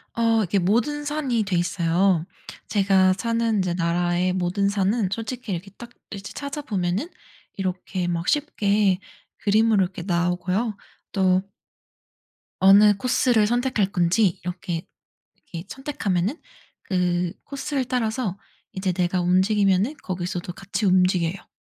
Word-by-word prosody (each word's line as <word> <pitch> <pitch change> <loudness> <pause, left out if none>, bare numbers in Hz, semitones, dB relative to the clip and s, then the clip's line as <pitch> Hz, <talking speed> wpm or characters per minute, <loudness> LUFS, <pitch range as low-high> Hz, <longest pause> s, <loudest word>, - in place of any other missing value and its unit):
어 230 -1 +3
이게 200 +1 0
모든 240 +11 +1
산이 285 -6 0
돼 195 -3 -2
있어요. 175 0 +1 0.4
제가 190 -2 +3
사는 230 +2 0
인제 185 -3 0
나라의 175 +1 +1
모든 185 +2 0
산은 200 +1 +1
솔직히 230 +1 -4
이렇게 185 +2 -4
딱 235 - -9 0.2
이제 200 -1 -7
찾아보면은 265 - -3 0.5
이렇게 185 -1 -3
막 170 0 -2
쉽게 205 -10 +2 0.4
그림으로 215 -1 +3
이렇게 185 0 -5
나오고요. 180 +5 0 0.4
또 185 -1 +2 1.2
어느 200 +2 +7
코스를 245 -1 +2
선택할 240 -4 0
건지 180 +1 +2
이렇게, 175 -1 -4 0.5
이렇게 170 -1 -9
선택하면은 225 - -2 0.4
그 180 -2 0
코스를 275 -1 -3
따라서 225 -5 -1 0.3
이제 190 -1 -1
내가 180 0 0
움직이면은 195 - +2
거기서도 175 -1 -4
같이 195 +3 -4
움직여요. 180 -1 +2
195 Hz, 285 characters per minute, -24 LUFS, 180-225 Hz, 1.2 s, 어느